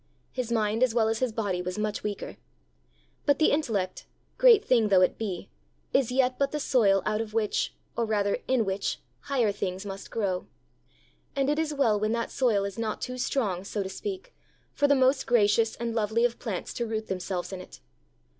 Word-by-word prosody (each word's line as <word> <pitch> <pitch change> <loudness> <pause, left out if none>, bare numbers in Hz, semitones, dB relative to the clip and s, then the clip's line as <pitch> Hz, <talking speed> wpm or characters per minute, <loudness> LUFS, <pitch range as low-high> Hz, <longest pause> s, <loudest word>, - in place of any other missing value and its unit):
His 250 -3 -3
mind 220 0 +1
as 250 -3 +3
well 225 -2 +3
as 225 0 -1
his 255 -2 0
body 205 -5 -1
was 180 +1 -4
much 210 -1 -2
weaker. 210 -1 -5 0.9
But 285 -1 +4
the 310 - +4
intellect, 215 -11 -1 0.3
great 465 -4 +7
thing 235 -4 +4
though 190 -3 +5
it 185 - +3
be, 195 -6 -5 0.4
is 265 -3 +3
yet 255 0 +2
but 280 -1 +2
the 300 - -2
soil 205 -9 +3
out 215 +1 0
of 220 -1 -6
which, 215 -2 0 0.2
or 235 - 0
rather 205 0 +1
in 255 -4 +2
which, 195 0 -1 0.2
higher 250 -7 +1
things 190 -1 -4
must 195 0 -7
grow, 195 -5 -2 0.9
and 275 +1 +2
it 295 - 0
is 320 -1 0
well 250 -8 +2
when 215 +1 0
that 230 0 -2
soil 225 -6 +2
is 200 +2 -5
not 220 -2 -2
too 255 0 -5
strong, 205 -9 -1
so 200 0 -3
to 190 - -5
speak, 390 - -6 0.4
for 285 - +2
the 285 - +5
most 260 +1 +3
gracious 225 -1 +3
and 235 0 -3
lovely 225 +1 +1
of 240 -1 -1
plants 210 -7 -4
to 235 - -2
root 220 0 -3
themselves 185 -1 -3
in 185 - -5
it. - - -13
225 Hz, 200 wpm, -27 LUFS, 200-255 Hz, 0.9 s, great